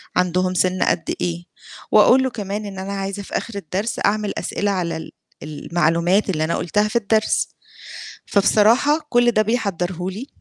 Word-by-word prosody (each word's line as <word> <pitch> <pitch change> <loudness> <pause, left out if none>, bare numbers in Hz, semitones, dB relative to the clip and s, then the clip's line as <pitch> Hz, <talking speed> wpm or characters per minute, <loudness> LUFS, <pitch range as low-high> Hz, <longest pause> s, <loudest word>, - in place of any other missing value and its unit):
عندهم 180 0 +1
سن 185 +1 +1
قد - - 0
إيه، 175 0 -3 0.5
وأقول 260 +1 +6
له 260 - 0
كمان 205 -1 -4
إن 195 -2 -7
أنا 195 +1 -5
عايزة 195 +1 -4
في - - -3
آخر 230 - -6
الدرس 200 +4 -3
أعمل 210 0 0
أسئلة 205 0 -2
على 175 -4 -2
ال 160 - -9 0.3
المعلومات 170 +5 0
اللي 155 -2 -1
أنا 170 - -1
قُلتها 210 +5 +1
في 235 - -9
الدرس، 220 0 +1 0.8
فبصراحة 225 +10 +3
كلّ 240 0 +4
ده 215 - +2
بيحضره 190 -5 -2
لي، 225 +9 -7
195 Hz, 160 wpm, -21 LUFS, 180-215 Hz, 0.8 s, وأقول